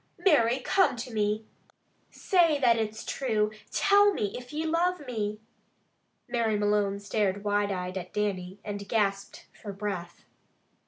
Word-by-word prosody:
Mary, 255 - +3
come 370 +3 +2
to 245 +1 -7
me. 210 0 0 0.6
Say 335 -6 +2
that 240 -4 +4
it's 220 -1 -3
true! 215 -5 0 0.2
Tell 405 0 +4
me, 205 -2 -2
if 245 0 -8
ye 310 +2 -3
love 335 0 0
me." 215 -4 -3 0.9
Mary 225 -3 0
Malone 205 -1 +1
stared 200 -1 -1
wide 205 0 +1
eyed 185 0 -3
at 180 0 -9
Dannie, 190 -3 -2
and 205 -1 -6
gasped 200 -3 -1
for 205 - -8
breath. 195 -4 -5
210 Hz, 140 wpm, -28 LUFS, 200-250 Hz, 0.9 s, that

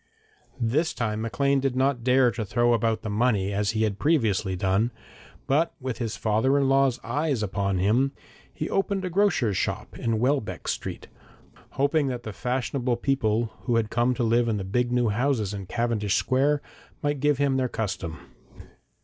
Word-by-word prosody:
This 135 +8 0
time, 110 -3 -2
Maclean 140 +5 +1
did 135 -1 -1
not 130 -2 +1
dare 125 0 +4
to 115 0 -4
throw 120 +3 +2
about 115 -1 0
the 110 - -3
money 105 -3 +1
as 100 +2 0
he 110 - +2
had 105 -2 -1
previously 110 - +1
done, 95 +5 +1 0.6
but 155 +5 +1
with 130 -3 -4
his 115 -3 -3
father 110 +6 +2
in 140 -1 +2
law's 135 -2 +3
eye 150 +3 -1 0.2
upon 100 -1 -1
him, 115 +9 +2 0.4
he - - -4
opened 195 -1 -1
a 180 - -3
grocer's 165 - +2
shop - - -3
in 115 -1 0
Welbeck 130 0 -1
Street, - - -4 0.7
hoping 145 +1 +1
that 125 -2 -4
the 110 - -6
fashionable 125 +1 -1
people 115 -4 0
who 120 -2 +1
had 110 -2 0
come 120 +2 +2
to 125 - -1
live 115 +1 +2
in 110 -2 0
the 100 - -3
big 120 +6 0
new 120 -2 +2
houses 110 -2 0
in 100 -2 -6
Cavendish 115 -4 0
Square 140 +3 +1 0.4
might 145 -1 0
give 145 0 +2
him 140 -1 +1
their 130 -1 0
custom. 95 -8 -4
120 Hz, 175 wpm, -26 LUFS, 110-135 Hz, 0.7 s, dare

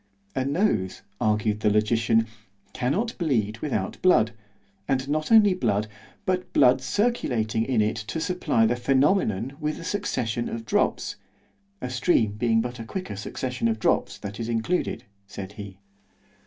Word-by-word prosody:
A 130 - +1
nose, 135 - 0 0.2
argued 105 0 +1
the 105 - +2
logician, 110 +2 +2 0.5
cannot 185 - -1
bleed 115 - 0
without 110 -10 -3
blood—and 130 - 0
not 155 +4 -1
only 210 -3 +7
blood—but 110 - -2
blood 125 +1 +5
circulating 125 - 0
in 120 -4 +2
it 105 - -1
to 110 +9 -4
supply 160 -9 +1
the 115 - +2
phænomenon 135 - +1
with 150 0 -2
a - - -8
succession 120 - -2
of 115 -1 -5
drops—(a 200 - -3
stream 125 - +2
being 115 +1 +1
but 125 +1 -5
a - - -4
quicker 180 - -5
succession 125 +4 -3
of 110 -1 0
drops, 110 - +1
that 100 +2 -7
is 115 0 -3
included, 115 +11 -1 0.2
said 100 -1 -7
he.) 100 -2 -9
120 Hz, 140 wpm, -25 LUFS, 110-155 Hz, 0.5 s, only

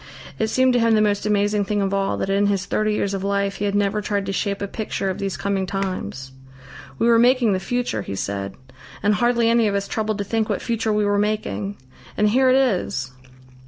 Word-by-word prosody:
It 220 - +1
seemed 255 +3 +3
to 245 - +3
him 230 -1 +3
the - - +4
most 210 -1 +1
amazing 205 0 +2
thing 205 +1 -1
of 195 0 0
all 195 0 0
that - - -2
in 200 +1 +2
his 200 -1 0
thirty 215 +1 0
years 200 -1 -1
of 195 -1 -3
life 200 0 -1
he 205 - -2
had 200 0 -1
never 205 +1 +1
tried 200 -1 -2
to 195 - -3
shape 200 0 -1
a 200 - -3
picture 200 -2 -3
of - - -6
these 195 -2 -3
coming 195 -1 -1
times. 180 - -4 0.7
"We - - +1
were 230 -1 +5
making 245 -3 +4
the 185 - 0
future," 240 - -2
he 100 - -5
said, 100 0 -4 0.5
"and 205 +1 +3
hardly 235 +1 +2
any 230 -1 +3
of 200 - 0
us 200 0 -1
troubled 215 -1 -2
to 205 - -2
think 220 +2 -1
what - - 0
future 225 -2 -1
we 210 0 +1
were 205 0 +2
making. 210 -1 -2 0.4
And 210 0 +3
here 260 +4 +4
it 255 - +5
is!" 185 - 0
205 Hz, 235 wpm, -22 LUFS, 195-220 Hz, 0.7 s, were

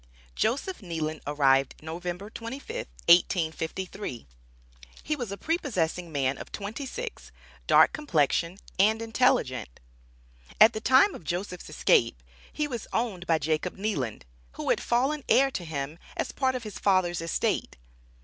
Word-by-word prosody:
Joseph 275 - -1
Kneeland 160 -4 -3
arrived 135 -2 +3
November 175 +5 -5
25, 235 +5 -7 0.3
1853. 170 - +1 0.8
He 305 - -1
was 240 -8 -5
a 200 - -4
prepossessing 180 - -1
man 135 -2 0
of - - -9
twenty 215 +7 -5
six, 475 - -7 0.4
dark - - +6
complexion, 170 - +1 0.2
and 215 +3 +4
intelligent. 220 - +1 0.8
At 225 +2 +8
the 215 - -4
time 260 - +5
of - - -9
Joseph's 180 +1 -4
escape, 115 - +2 0.3
he 300 - -1
was 240 -6 -5
owned 200 -7 -2
by 165 - +4
Jacob 155 +4 -1
Kneeland, 190 - -2 0.3
who - - -1
had - - +1
fallen 270 +5 +1
heir 270 +1 +5
to 185 - -4
him 155 0 -5 0.2
as - - -2
a - - -24
part 260 -1 +1
of 250 - -4
his 215 -2 -7
father's 185 -3 +2
estate. 165 - -1
185 Hz, 140 wpm, -27 LUFS, 160-235 Hz, 0.8 s, At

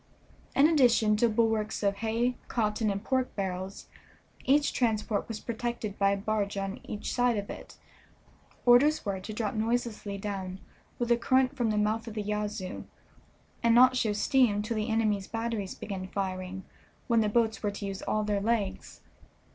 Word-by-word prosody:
In 280 +2 +6
addition 240 -8 +4
to 235 +2 +3
bulwarks 220 -1 0
of 200 0 +1
hay, 230 +3 0
cotton, 215 -1 0
and 200 +1 -2
pork 260 0 -1
barrels, 190 -1 -4 0.6
each 290 +2 +3
transport 220 -3 0
was 225 -2 -5
protected 235 -3 -4
by 200 0 +4
a 200 - +1
barge 205 0 -1
on 195 +1 -3
each 210 - -5
side 245 -2 +2
of 200 0 -4
it. - - -10 0.9
Orders 255 +5 +5
were 195 -2 -2
to 190 +4 -7
drop 215 -1 -2
noiselessly 220 -2 -2
down 195 -2 -5 0.4
with 240 -1 -2
the 235 - +5
current 260 +2 +2
from 240 -4 0
the 215 - 0
mouth 215 +2 0
of 220 - -7
the 210 - -2
Yazoo, 210 -2 -3 0.8
and 230 0 +4
not 255 +1 +7
show 225 -4 +1
steam 210 -1 +2
till 220 +1 -3
the 215 +2 -1
enemy's 215 -3 +1
batteries 225 -4 -3
began 190 -2 -5
firing, 190 -1 -4 0.4
when 230 -2 +3
the 215 - +1
boats 225 0 +1
were 210 - 0
to 200 0 -6
use 195 -1 -5
all 215 - 0
their 205 -1 0
legs. 210 -3 -2
215 Hz, 170 wpm, -29 LUFS, 200-235 Hz, 0.9 s, not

